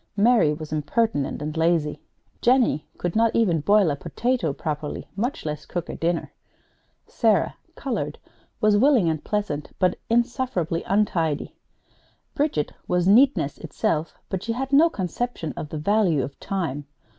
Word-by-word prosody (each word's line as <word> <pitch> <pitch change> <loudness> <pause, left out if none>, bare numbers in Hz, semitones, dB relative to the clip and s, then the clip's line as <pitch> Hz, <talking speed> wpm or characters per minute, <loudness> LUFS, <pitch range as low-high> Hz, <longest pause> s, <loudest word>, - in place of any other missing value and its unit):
Mary 220 -6 +4
was 155 0 -5
impertinent 155 - 0
and 150 +1 -4
lazy. 160 -2 +1 0.4
Jennie 240 - +3
could 175 -1 -3
not 225 0 +3
even 185 -8 +3
boil 200 -1 +4
a - - -1
potato 175 - -1
properly, 150 0 -4
much 245 +10 -2
less 150 -1 -4
cook 175 -2 -4
a - - -4
dinner. 170 0 -1 0.7
Sarah - - +2 0.2
(colored) - - -3 0.4
was 215 -2 +4
willing 250 - +4
and 155 -2 -4
pleasant, 205 -9 -2
but 180 -1 +1
insufferably 235 -8 0
untidy. 170 -7 0 0.8
Bridget 280 - 0 0.2
was 180 0 +1
neatness 225 - +4
itself, 155 0 -2
but 190 -2 -3
she 230 - -2
had 265 +3 -4
no 315 +4 +7
conception 190 - -3
of 150 - -6
the 155 - -5
value 180 -4 +2
of 135 +2 -7
time. 145 -7 -3
180 Hz, 145 wpm, -24 LUFS, 155-230 Hz, 0.8 s, no